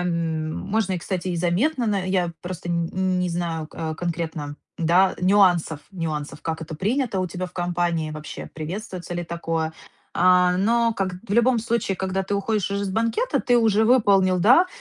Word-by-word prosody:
м, 160 -2 -2
можно 205 -2 -1
и, 180 - -1
кстати, 185 +1 -3
и 175 - -1
заметно, 230 - +1
на 205 -2 +1
я 180 -2 +1
просто, 175 -1 -6
н 180 +2 0
не 180 0 0
знаю, 165 -2 -3
а, 160 -1 -3
конкретно, 160 -4 -3 0.2
да, 175 +3 +3
нюансов. 180 -5 +3
Нюансов, 155 -5 -4
как 160 0 -3
это 160 -1 -7
принято 215 - 0
у 185 - 0
тебя 180 +1 -4
в 180 - -15
компании, 175 -3 -1
вообще 155 0 -7
приветствуется 175 +2 -6
ли 175 0 -3
такое. 165 -1 -2 0.4
Э, 180 0 +5
но, 230 +4 +2
как 190 -2 -2
в - - -2
любом 235 +1 +4
случае, 225 -4 -1
когда 190 +1 -1
ты 200 +2 -3
уходишь 200 0 -1
из 200 0 -1
банкета, 230 - 0
ты 245 -1 +3
уже 220 -1 +3
выполнил, 200 -6 +4
да, 255 - +6
180 Hz, 175 wpm, -23 LUFS, 170-205 Hz, 0.4 s, да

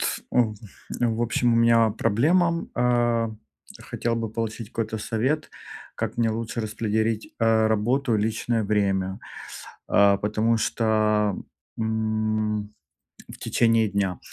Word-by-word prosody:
Тс - - -2
М, 115 -3 +2 0.5
в 115 -1 +1
общем, 120 0 +1
у - - +3
меня 115 -1 +4
проблема. 170 - +2
Э, 120 -2 +2 0.6
хотел 115 - -1
бы 115 -1 -3
получить 110 0 -4
какой-то 110 -1 -3
совет, 130 +9 -1 0.5
как - - -4
мне 115 -1 +2
лучше 115 +1 -4
распределить, 110 0 -2
э, 110 -1 +3
работу 115 +4 +1
и 105 - 0
личное 115 +1 -1
время. 95 -2 0 0.7
Э, 100 -1 +4
потому 110 +3 +1
что, 110 -2 +1 0.4
м, 110 -1 -1 0.6
в - - -11
течение 115 -2 +3
дня. 100 -2 -1
110 Hz, 120 wpm, -24 LUFS, 105-115 Hz, 0.7 s, меня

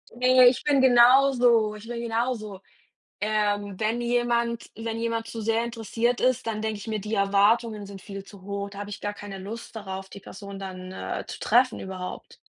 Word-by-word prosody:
Ne 255 +1 +6
ich 245 0 +3
bin 285 -2 +3
genauso. 245 -3 +5
Ich 210 +1 -11
bin 240 0 -4
genauso. 225 -4 -2 0.6
Ähm, 205 -1 0
wenn 225 +2 0
jemand 235 -1 0
wenn 225 0 -4
jemand 230 -1 -2
zu 230 - -6
sehr 225 +1 +1
interessiert 235 +1 -1
ist, 255 -2 +1
dann 215 -1 -2
denke 220 -1 -2
ich 205 - -10
mir: 215 -1 -2
„Die 210 +2 -5
Erwartungen 205 +2 +2
sind 195 -1 -10
viel 195 0 -8
zu 200 -1 -14
hoch.“ 200 +1 -4
Da 200 - -9
habe 205 0 -6
ich 205 - -7
gar 205 0 -3
keine 205 -1 -8
Lust 215 +5 -8
darauf, 190 -2 -6
die - - -10
Person 200 0 -9
dann, 185 -1 -7
äh, - - -5
zu - - -7
treffen 250 +3 +3
überhaupt. 185 -1 -7
220 Hz, 190 wpm, -26 LUFS, 200-235 Hz, 0.6 s, Ne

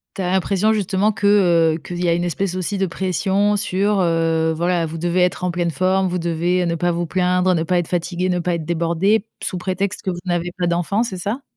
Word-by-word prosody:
Tu - - -5
as 180 -1 -1
l'impression 195 +3 +1
justement 205 +1 +1
que, 180 -6 +3
heu, - - -3
qu'il 175 +2 -5
y - - +2
a 170 - +4
une 175 +1 0
espèce 180 +1 -2
aussi 185 +2 -2
de 195 - +1
pression 190 +3 0
sur, 200 0 0
heu, 165 -1 +1
voilà, 170 +1 0
vous 165 +1 -5
devez 175 +2 0
être 180 0 0
en 180 - 0
pleine 175 0 -1
forme, 185 +3 +1
vous 180 0 -2
devez 175 +1 0
ne 170 - 0
pas 175 +1 0
vous 170 0 -2
plaindre, 180 +1 +1
ne 160 - +1
pas 180 +2 +1
être 175 - -2
fatigués, 180 +1 -1
ne 180 -1 +1
pas 175 0 -1
être 160 -2 -6
débordés 170 +6 +1 0.2
sous 185 - -3
prétexte 185 +2 -2
que 190 - -2
vous 175 - -5
n'avez 175 0 -1
pas 175 - 0
d'enfant, 175 +5 0
c'est 215 -6 -4
ça? 205 +9 -3
180 Hz, 240 wpm, -20 LUFS, 170-190 Hz, 0.2 s, a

